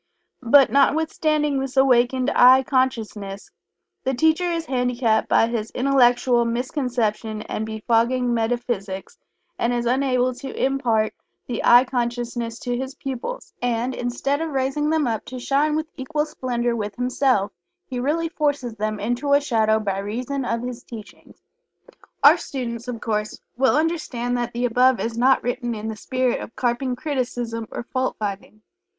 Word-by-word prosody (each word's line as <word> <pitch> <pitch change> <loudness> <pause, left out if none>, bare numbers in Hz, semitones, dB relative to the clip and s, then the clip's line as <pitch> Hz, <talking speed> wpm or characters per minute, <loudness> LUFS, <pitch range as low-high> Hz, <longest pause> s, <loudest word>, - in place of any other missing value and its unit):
But, 265 +2 +5
notwithstanding 300 0 +2
this 270 0 -5
awakened 255 0 +3
"I" 260 +1 +7
consciousness, 220 -7 -2 0.5
the 265 0 0
teacher 320 +6 +2
is 330 -1 -2
handicapped 250 -4 0
by - - +5
his 225 -2 -3
intellectual 245 -2 +3
misconception 235 -3 -2
and 220 - -4
befogging 235 +3 +1
metaphysics, 225 -4 -3 0.4
and 235 - +1
is 240 -1 -1
unable 255 0 +1
to 265 +2 -8
impart 245 -5 +1 0.3
the 240 - -4
"I" 245 +2 +7
consciousness 240 -2 -3
to 245 0 -2
his 265 +2 -5
pupils, 275 - -6
and, 245 +1 -1
instead 255 +5 -2
of 325 - -2
raising 275 +2 -1
them 315 -2 +2
up 225 -3 -2
to 255 - -7
shine 285 +4 +1
with 315 0 -1
equal 300 +3 -2
splendor 245 -5 -2
with 210 -2 -4
himself, 250 -4 +1 0.3
he 250 -2 -5
really 310 +6 0
forces 285 -7 -1
them 215 0 -3
into 245 +7 0
a 285 - +6
shadow 220 -6 +2
by 195 -2 -2
reason 250 +7 -3
of 230 0 -2
his 250 0 -5
teachings. 220 -3 -12 0.8
Our - - +8
students, 240 -3 -5
of 240 -2 -5
course, 210 -1 -2 0.2
will 265 +2 +3
understand 300 -7 -1
that 240 0 -2
the 240 +1 -1
above 250 +1 +3
is 230 0 -3
not 255 +3 +3
written 245 -1 -2
in 215 +1 -5
the 220 - -4
spirit 255 +3 -1
of - - -9
carping 250 +1 -1
criticism 245 -5 -3
or - - -5
fault 255 +1 -2
finding. 210 +1 -6
245 Hz, 155 wpm, -22 LUFS, 230-270 Hz, 0.8 s, Our